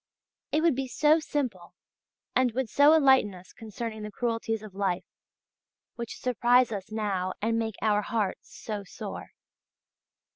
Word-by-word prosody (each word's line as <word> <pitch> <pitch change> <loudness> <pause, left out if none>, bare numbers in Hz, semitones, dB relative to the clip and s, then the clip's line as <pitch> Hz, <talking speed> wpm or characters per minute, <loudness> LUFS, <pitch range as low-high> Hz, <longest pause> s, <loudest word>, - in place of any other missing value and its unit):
It 310 +2 +1
would 335 -3 +5
be 265 +1 -3
so 305 +5 +4
simple, 255 - -3 0.6
and 255 -2 +3
would 255 -1 -1
so 290 +2 +6
enlighten 265 -9 +4
us 180 0 -14
concerning 220 0 -6
the 210 - -5
cruelties 225 0 -2
of 210 -3 -10
life, 190 -2 -1 0.9
which 235 -1 -6
surprise 245 0 +3
us 200 -1 -5
now 195 -4 -1
and 225 +2 0
make 220 -2 -2
our 210 -1 +3
hearts 210 -3 -2
so 210 -2 -5
sore. 185 - -8
225 Hz, 145 wpm, -28 LUFS, 205-255 Hz, 0.9 s, so